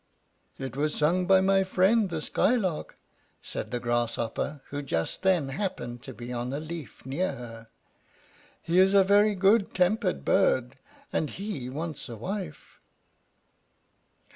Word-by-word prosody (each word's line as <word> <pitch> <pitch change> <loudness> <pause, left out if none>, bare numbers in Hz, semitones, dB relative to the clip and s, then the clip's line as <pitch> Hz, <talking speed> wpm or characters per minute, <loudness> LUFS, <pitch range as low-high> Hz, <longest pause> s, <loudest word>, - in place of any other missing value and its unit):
"It 130 -2 -6
was 150 +2 0
sung 175 +4 +2
by 190 -1 +6
my 195 0 +4
friend, 190 +3 +3
the 160 -3 -3
Skylark," 195 -10 0 0.5
said - - -5
the 125 - -2
Grasshopper, 120 +4 -2
who 145 0 -3
just 80 - -2
then 180 -7 +2
happened 130 - -4
to 130 - -9
be 120 +1 -7
on 120 +1 -3
a 140 - -2
leaf 160 -4 -8
near 170 +8 -1
her. 115 -2 -9 1.0
"He 170 +2 +2
is 190 +1 +5
a 195 - +7
very 205 +2 +4
good 195 +2 +3
tempered 185 +2 +1
bird, 130 -9 +2 0.4
and 155 - 0
he 190 - -5
wants 155 0 -5
a 115 - -6
wife." 180 - -6
160 Hz, 140 wpm, -28 LUFS, 130-190 Hz, 1.0 s, a